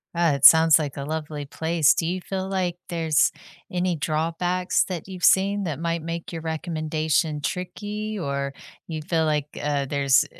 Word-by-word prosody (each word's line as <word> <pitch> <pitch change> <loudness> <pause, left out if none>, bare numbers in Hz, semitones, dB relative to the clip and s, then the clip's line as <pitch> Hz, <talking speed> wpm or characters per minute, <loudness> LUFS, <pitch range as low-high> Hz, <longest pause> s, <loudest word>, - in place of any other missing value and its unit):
Uh, 170 -2 +3
it 140 - +2
sounds 160 0 +8
like 145 -3 -4
a 140 - -4
lovely 150 -1 -4
place. 160 +1 +2
Do 165 - -2
you 180 +2 -2
feel 190 +1 -4
like 185 -3 -1
there's 160 -3 +2 0.4
any 180 0 0
drawbacks 165 +4 0
that 180 -3 -6
you've 185 -2 -9
seen 200 +1 +4
that 155 -5 -3
might 170 0 -1
make 165 +1 -5
your 165 -2 -5
recommendation 155 -1 -1
tricky, 205 +7 -4
or 140 -5 -3 0.3
you 160 -2 -4
feel 160 0 0
like 150 -1 0
uh, - - -5
eh, 145 -1 -1
there's 140 0 +3
165 Hz, 175 wpm, -24 LUFS, 150-180 Hz, 0.4 s, sounds